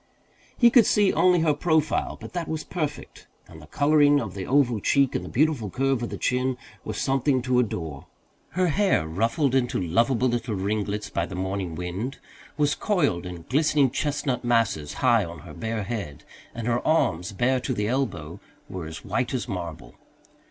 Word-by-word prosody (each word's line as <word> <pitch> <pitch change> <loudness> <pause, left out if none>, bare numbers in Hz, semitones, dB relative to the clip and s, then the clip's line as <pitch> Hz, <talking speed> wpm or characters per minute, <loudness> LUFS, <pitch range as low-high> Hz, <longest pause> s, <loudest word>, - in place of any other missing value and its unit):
He 240 -1 +6
could 240 -3 +6
see 205 -2 +3
only 180 -2 +4
her 160 -2 +3
profile, 155 0 0
but - - -10
that 175 -2 -3
was 160 -1 -3
perfect, 150 -5 -5 0.2
and 80 -1 -13
the 75 - -14
colouring 145 - +4
of 100 -7 -5
the 95 -2 -6
oval 125 -5 +3
cheek 135 +5 +2
and - - -2
the - - -7
beautiful 140 -6 +1
curve 135 +2 0
of 120 - -3
the - - -5
chin 125 0 0 0.3
were - - -5
something 135 -1 +1
to 125 0 +2
adore. 80 - -3 0.5
Her 185 -1 +3
hair, 190 - +2
ruffled 115 - 0
into 130 -2 +1
lovable 115 +9 +2
little 120 -2 -1
ringlets 105 +1 -2
by - - -1
the - - -7
morning 95 -2 -3
wind, 90 - -4 0.4
was 145 -1 +2
coiled 145 - 0
in 90 -2 -8
glistening 145 -1 +3
chestnut 145 -4 -1
masses 115 -11 +1
high 115 -3 +5
on 85 -3 -8
her - - -11
bare 110 -1 -3
head, 100 -9 -5 0.3
and 115 -1 -5
her 120 0 +1
arms, 90 - +1
bare 125 +5 +1
to 125 +1 -4
the 105 -1 -1
elbow, 100 - -2 0.3
were 90 -4 -6
as 80 0 -9
white 130 0 -1
as 125 -1 -3
marble. 85 -6 -6
120 Hz, 180 wpm, -25 LUFS, 95-145 Hz, 0.5 s, He